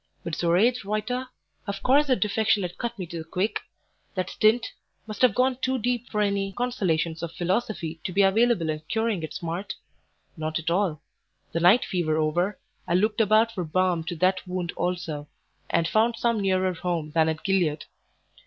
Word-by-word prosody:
But 170 - -5
Zoraide 185 +10 +2
Reuter? 215 +5 -2 0.4
Of 200 -1 -4
course 285 +3 +4
her 260 - +4
defection 210 0 +1
had 175 -1 -6
cut 235 -1 -3
me 185 - -4
to 170 0 -6
the - - -5
quick? 185 +6 -1 0.6
That 185 -1 -2
stint 225 +3 +2 0.3
must 215 -1 -7
have 250 -6 +5
gone 255 0 +2
too 260 0 0
deep 245 0 -1
for 210 - 0
any 200 -1 0
consolations 175 -10 -1
of 170 -1 -4
philosophy 175 -2 -2
to - - -2
be 200 +2 +3
available 195 -4 +3
in 155 0 -5
curing 225 -5 0
its 155 - -6
smart? 170 +4 -4 0.6
Not 155 -1 -2
at 160 +1 -2
all. 175 -4 0 0.5
The 165 - -1
night 180 +8 +5
fever 165 -5 0
over, 170 +6 0 0.3
I 170 - +1
looked 210 +4 +2
about 220 +2 +4
for 185 -5 -3
balm 175 +1 +1
to 175 - -4
that 185 +3 +2
wound 180 -2 -3
also, 175 -5 -3 0.4
and 165 - +2
found 225 +5 +2
some 235 -1 +1
nearer 185 -1 +1
home 165 -3 -3
than 160 0 +3
at 160 0 -3
Gilead. 180 -6 +1
185 Hz, 180 wpm, -26 LUFS, 170-220 Hz, 0.6 s, have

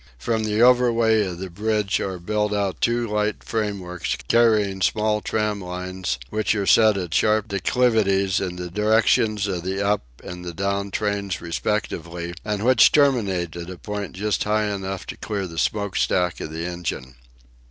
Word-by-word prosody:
From 110 - -1
the 105 +1 0
overway 115 -4 +4
of 90 - -6
the 95 0 -6
bridge 105 +1 0
are 95 -1 -3
built 105 +4 -1
out 100 -2 -1
two 120 0 +1
light 105 0 -1
frameworks 100 -6 -3
carrying 105 -5 +3
small 105 +3 +1
tram 105 -2 -1
lines 90 -5 -4
which 110 0 0
are 100 -2 -1
set 110 0 +5
at 90 -4 -4
sharp 110 +2 +2
declivities 100 -2 +2
in 90 -2 -3
the 90 -1 -6
directions 105 +1 +2
of 95 -4 -2
the 95 +2 -3
up 105 0 +2 0.2
and 90 0 -8
the 85 -2 -7
down 100 +1 -1
trains 100 -2 -2
respectively, 85 -1 -3
and 105 0 -2
which 130 -2 +6
terminate 100 - +2
at 85 0 -7
a 90 - -7
point 105 +1 -5
just 105 +3 -1
high 105 0 0
enough 95 -1 -5
to - - -7
clear 100 -2 -3
the 80 -2 -6
smoke 100 -2 -1
stack 90 -2 +1
of - - -5
the 80 +2 -4
engine. 85 -8 -5
100 Hz, 170 wpm, -23 LUFS, 90-110 Hz, 0.2 s, which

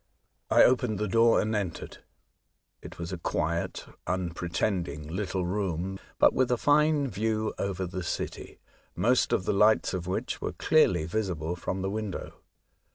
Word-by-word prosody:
I - - +6
opened 125 -4 +3
the 105 - -1
door 115 +4 +4
and 110 +1 0
entered. 95 -6 -4 0.8
It - - -10
was 85 +1 -5
a 90 - -5
quiet, 85 0 -2 0.2
unpretending 85 -3 -2
little 95 +1 -2
room, 95 0 -2 0.2
but - - +5
with 130 -1 +2
a 125 - +3
fine 145 +1 +3
view 110 0 -1
over 95 -1 -2
the 90 +1 -5
city, 85 - -5 0.4
most 125 +2 +2
of 95 - +1
the - - +1
lights 105 +2 +4
of 90 -2 -3
which 90 - -3
were - - -3
clearly 95 - +3
visible 85 -3 -2
from 95 +2 -4
the 95 - -1
window. 105 -3 -5
95 Hz, 155 wpm, -28 LUFS, 85-110 Hz, 0.8 s, I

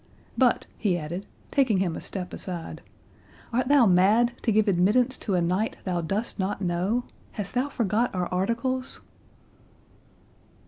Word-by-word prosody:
—But," 255 -2 +3
he 190 -5 +1
added, 170 +4 -5 0.2
taking 260 -8 +3
him 180 -3 0
a - - -6
step 180 -2 -5
aside, 175 -3 -5 0.7
"art 250 +2 +1
thou 280 -3 +6
mad? 205 +6 +4
to 230 - +1
give 215 0 +3
admittance 210 +8 +3
to 200 - -1
a 175 - +2
knight 185 +6 0
thou 180 -2 -1
dost 200 +7 -2
not 195 +2 -1
know? 185 +6 0 0.3
Hast 200 -2 -5
thou 255 +3 0
forgot 230 -1 +1
our 180 -1 0
articles?" 235 +7 -1
205 Hz, 145 wpm, -26 LUFS, 180-240 Hz, 0.7 s, thou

